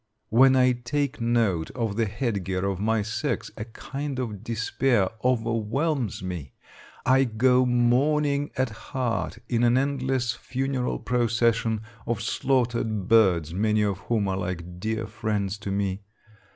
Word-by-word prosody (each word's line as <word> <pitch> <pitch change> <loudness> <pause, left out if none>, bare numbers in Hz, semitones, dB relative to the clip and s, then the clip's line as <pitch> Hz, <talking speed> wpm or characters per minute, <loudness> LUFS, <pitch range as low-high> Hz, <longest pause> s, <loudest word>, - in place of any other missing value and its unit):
When 130 +4 +6
I 130 -1 +5
take 135 +2 -2
note 115 -9 +1
of 115 -5 -1
the 115 0 +1
head 110 -2 -2
gear 95 +1 -2
of 100 -2 -1
my 110 +1 +1
sex 110 +1 -2
a 105 - -5
kind 135 +4 -6
of 110 -6 -4
despair 115 -2 +1
overwhelms 120 - 0
me. 85 -8 -5 0.5
I 130 +1 +5
go 125 +2 +3
mourning 140 +4 +2
at 130 -3 +1
heart 115 -3 -3
in 120 -1 +1
an 120 +1 +4
endless 130 -3 0
funeral 130 +1 -2
procession 115 -2 +1 0.3
of 120 - 0
slaughtered 115 -6 0
birds, 90 -8 +4
many 105 +2 +2
of 100 -2 -1
whom 105 +1 0
are 95 -1 -1
like 90 -2 -5
dear 110 +2 -2
friends 105 -2 -2
to 100 -1 -4
me. 100 0 -1
115 Hz, 140 wpm, -26 LUFS, 105-130 Hz, 0.5 s, When